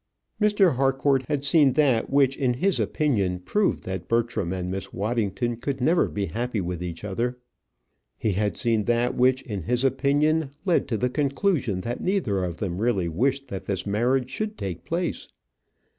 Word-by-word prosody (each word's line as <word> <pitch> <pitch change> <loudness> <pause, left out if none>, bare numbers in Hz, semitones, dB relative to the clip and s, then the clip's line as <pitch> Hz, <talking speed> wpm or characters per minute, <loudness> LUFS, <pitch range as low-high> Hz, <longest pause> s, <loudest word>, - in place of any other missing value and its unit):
Mr. 205 - +4
Harcourt 135 0 +2
had 145 -2 -1
seen 140 -2 +5
that 135 -6 +2
which 135 -1 +3
in 125 -3 0
his 190 +9 +1
opinion 105 - 0
proved 190 - 0
that 95 -2 -5
Bertram 115 -6 0
and 90 -1 -3
Miss 95 0 -5
Waddington 110 +1 -1
could 130 +3 -3
never 160 +8 +3
be 100 -1 -2
happy 120 +2 -2
with 90 -2 -3
each 85 0 -6
other. 120 +5 -2 0.8
He 110 - 0
had 105 +2 -1
seen 115 -3 +1
that 120 +1 +1
which 130 +1 +2
in 100 -5 -4
his 125 +9 0
opinion 145 +3 +2 0.2
led 180 -3 +2
to 115 -5 -1
the 125 +4 0
conclusion 140 - 0
that 120 +5 -4
neither 150 - 0
of 85 -2 -3
them 90 -3 -3
really 100 -7 +1
wished 135 +10 0
that 95 - -6
this 100 -2 -2
marriage 125 +5 +1
should 215 0 -3
take 90 -3 -5
place. 170 +1 -2
120 Hz, 175 wpm, -25 LUFS, 100-140 Hz, 0.8 s, seen